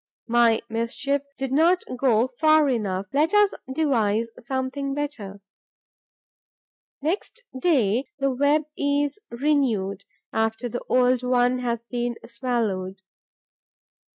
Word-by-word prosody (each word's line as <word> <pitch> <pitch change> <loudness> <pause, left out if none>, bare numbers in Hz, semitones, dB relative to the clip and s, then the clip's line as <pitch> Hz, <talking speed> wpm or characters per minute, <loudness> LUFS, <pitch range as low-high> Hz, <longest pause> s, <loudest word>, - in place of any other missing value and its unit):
My 235 -1 +3
mischief 250 +5 -1 0.2
did 265 -1 -3
not 335 +6 +3
go 245 -1 +2
far 310 -1 +5
enough. 200 -7 -1
Let 310 +7 +2
us 415 -1 +5 0.2
devise 230 -7 +1
something 265 +2 -3
better. 215 -10 -5 1.6
Next 390 +9 -3
day, 260 - +2
the 275 -1 +1
web 285 +4 +2
is 285 +5 0
renewed, 235 -8 0 0.3
after 225 +2 0
the 240 +1 -4
old 250 0 +3
one 250 0 +2
has 235 -2 -2
been 240 0 -2
swallowed. 205 -5 -2
250 Hz, 105 wpm, -24 LUFS, 225-285 Hz, 1.6 s, far